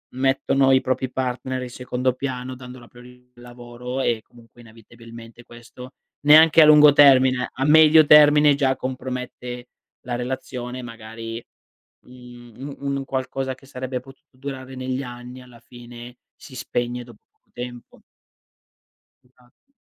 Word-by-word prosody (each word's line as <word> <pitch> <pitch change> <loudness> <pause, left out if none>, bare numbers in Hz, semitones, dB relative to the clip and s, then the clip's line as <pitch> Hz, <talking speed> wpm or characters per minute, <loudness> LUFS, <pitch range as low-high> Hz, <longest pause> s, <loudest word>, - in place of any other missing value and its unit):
mettono 135 0 +1
i 130 - +4
propri 130 0 -2
partner 130 0 -4
in 125 - -7
secondo 125 +1 -3
piano 130 -1 -6
dando 125 0 -12
la 120 - -16
priori 125 0 -18
lavoro 120 +1 -8
e 115 -4 -1
comunque 120 0 -20
inevitabilmente 115 +1 -15
questo, 120 +2 -13 0.3
neanche 155 +2 +6
a 155 - +8
lungo 150 -1 +7
termine, 130 -3 +5
a 135 - -3
medio 155 +1 +6
termine 150 -1 +6
già 135 -2 0
compromette 125 -1 -7 0.4
la 120 -1 -3
relazione 125 0 -6
magari, 115 0 -9 0.6
mhmm, 125 +1 -12
u 140 - -10
un 140 0 -2
qualcosa 130 0 -4
che 135 - -21
sarebbe 130 -1 -6
potuto 135 0 -19
durare 130 -1 -8
negli 130 +1 -4
anni 125 0 -10
alla 125 -2 -17
fine 120 0 -13 0.2
si 130 - -14
spegne 120 0 -4
dopo 120 -3 -17
poco - - -48
tempo. 120 -1 -10 1.2
Esatto. 125 - -30
125 Hz, 135 wpm, -22 LUFS, 120-135 Hz, 1.2 s, a